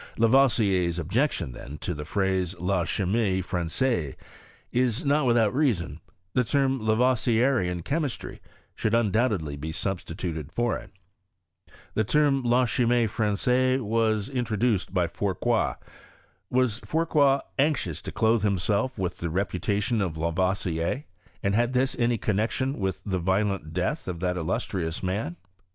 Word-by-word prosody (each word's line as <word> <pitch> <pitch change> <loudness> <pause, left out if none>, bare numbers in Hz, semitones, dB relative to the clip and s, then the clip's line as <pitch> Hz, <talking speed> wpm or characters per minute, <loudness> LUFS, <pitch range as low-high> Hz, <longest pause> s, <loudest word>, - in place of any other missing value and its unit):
Lavoisier's 110 -8 +3
objection, 95 - 0
then, 70 +4 -9
to 85 - -3
the 75 -2 -6
phrase 95 -1 -1
La 90 -1 0
Ckimie 100 +1 0
Fran^aise, 85 - -1 0.6
is 125 +3 +1
not 145 -1 +2
without 115 -3 +3
reason, 90 - 0 0.3
the 125 - +3
term 135 +2 +1
Lavoisierian 115 -4 +2
Chemistry 145 -4 -3 0.3
should 110 +1 0
undoubtedly 105 - +1
be 75 +3 -5
substituted 85 -3 -4
for 120 +4 0
it. - - -8 1.0
This 110 -2 0
term. 140 +1 +3
La 125 +1 +3
Chimie 120 0 +2
Fran^ 105 0 0
^ise 130 +5 +2
was 110 -2 +1
introduced 120 -5 0
by 90 -2 +2
Fourcroy. 100 +6 0 0.7
Was 125 -3 +1
Fourcroy 145 -4 +2 0.2
anxious 125 - +1
to - - -6
clothe 110 0 +2
himself 105 +5 0
with 90 -2 -3
the 85 - -2
reputation 100 +5 0
of 85 -5 -2
Lavoisier, 85 - -1 0.4
and 100 - +1
had 120 +4 +2
this 130 +1 +1
any 120 0 +2
connexion 110 +7 -1
with 95 -2 -2
the 95 -3 -1
violent 95 -2 0
death 90 - -2
of 90 -2 -4
that 90 -1 0
illustrious 90 -1 -2
man? 95 -2 -2
105 Hz, 135 wpm, -26 LUFS, 90-125 Hz, 1.0 s, Lavoisier's